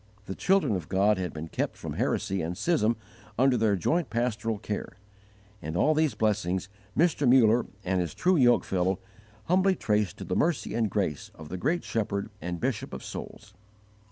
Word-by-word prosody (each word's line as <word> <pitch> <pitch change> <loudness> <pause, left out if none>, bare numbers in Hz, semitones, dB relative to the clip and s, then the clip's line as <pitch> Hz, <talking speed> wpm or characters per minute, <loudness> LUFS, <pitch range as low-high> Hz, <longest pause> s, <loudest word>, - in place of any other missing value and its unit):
The 95 - -4
children 190 - +2
of 90 -3 -5
God 100 +1 +3
had 90 -3 -2
been 80 +2 -6
kept - - -3
from - - -6
heresy 95 0 -1
and 85 +2 -3
schism 120 - +2 0.4
under 130 +1 +4
their 110 -3 +2
joint 160 - 0
pastoral 115 -2 -1
care; 105 0 -5 0.6
and 80 +2 -4
all 155 - +4
these 155 -6 +1
blessings 95 -4 0 0.3
Mr. 150 -5 +3
Muller 120 -2 +5 0.2
and 95 0 +1
his 85 - -4
true 185 +1 +3
yoke 120 -5 +5
fellow 95 0 0 0.5
humbly 185 - +3
traced 105 - 0
to - - -7
the - - -2
mercy 170 +1 0
and 110 -1 +1
grace 90 -8 -2
of 80 -1 -11
the 90 - -4
great 160 - 0
Shepherd 105 -2 -2
and 90 0 -4
Bishop - - -2
of - - -8
souls. 105 -1 -8
105 Hz, 180 wpm, -28 LUFS, 95-130 Hz, 0.6 s, Muller